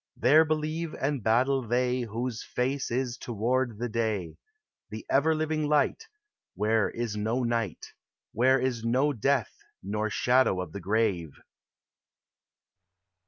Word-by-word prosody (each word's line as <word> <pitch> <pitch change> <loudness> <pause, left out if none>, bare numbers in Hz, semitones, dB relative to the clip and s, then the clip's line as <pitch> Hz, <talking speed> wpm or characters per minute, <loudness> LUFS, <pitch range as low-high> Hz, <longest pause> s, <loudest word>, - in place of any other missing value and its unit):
There 145 +7 +6
believe 155 +1 -2
and 140 -1 -1
battle 130 +5 +2
they 125 +1 0
AVI - - -3
lose 120 +1 -3
face 130 +3 -2
is 125 0 -2
toward 120 +1 -1
the 120 +2 -2
day, 110 -6 -1
T - - -16 0.6
I - - -5
Tie 110 - -7
ever 160 +4 +3
living 155 -1 -1
light, 150 - +1 0.5
Where 105 +2 +1
is 115 -3 -4
no 110 +4 -1
night, 115 -5 -2 0.4
Where 130 +3 +3
is 125 -3 -1
no 130 +5 +2
death 130 -1 0 0.3
nor 105 +3 -2
shadow 125 -3 +2
of 90 -3 -5
the 100 - -6
grave." 95 -6 -1
120 Hz, 140 wpm, -28 LUFS, 110-135 Hz, 0.6 s, There